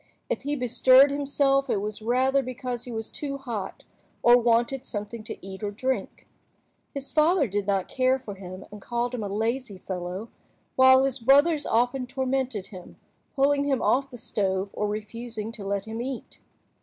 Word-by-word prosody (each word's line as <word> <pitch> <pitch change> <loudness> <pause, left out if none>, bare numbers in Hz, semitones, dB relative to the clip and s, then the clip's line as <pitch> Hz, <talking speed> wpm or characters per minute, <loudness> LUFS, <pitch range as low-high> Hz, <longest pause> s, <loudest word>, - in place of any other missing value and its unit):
If - - -1
he 290 +2 -2
bestirred 255 +2 +5
himself, 275 -1 +1
it - - +2
was 210 +1 -5
rather 260 +4 +2
because 250 -1 -5
he 250 - -7
was 225 -1 -5
too 280 -2 -4
hot, 235 -8 -6 0.4
or 240 0 +8
wanted 240 +2 +2
something 210 +1 -6
to - - -6
eat 190 +1 -8
or 205 - -2
drink. 255 +6 -3 0.6
His 280 -1 -6
father 310 -1 +3
did 205 0 -2
not 195 -2 +1
care 260 0 +2
for 250 -6 -8
him, 185 -1 -9
and 210 -1 -10
called 240 +3 -2
him 245 - -3
a - - -2
lazy 225 +1 -2
fellow, 185 +3 -5 0.5
while 260 0 +7
his 270 0 -1
brothers 285 +5 +4
often 245 +3 +1
tormented 260 -5 -2
him, 180 -1 -11 0.4
pulling 285 +1 +3
him 275 -3 +1
off 270 +2 +2
the 245 - -10
stove 195 -3 -2
or 210 - -1
refusing 220 +1 -5
to 225 -3 -8
let 200 0 -2
him 225 +1 -5
eat. 255 -1 -6
245 Hz, 175 wpm, -26 LUFS, 210-270 Hz, 0.6 s, or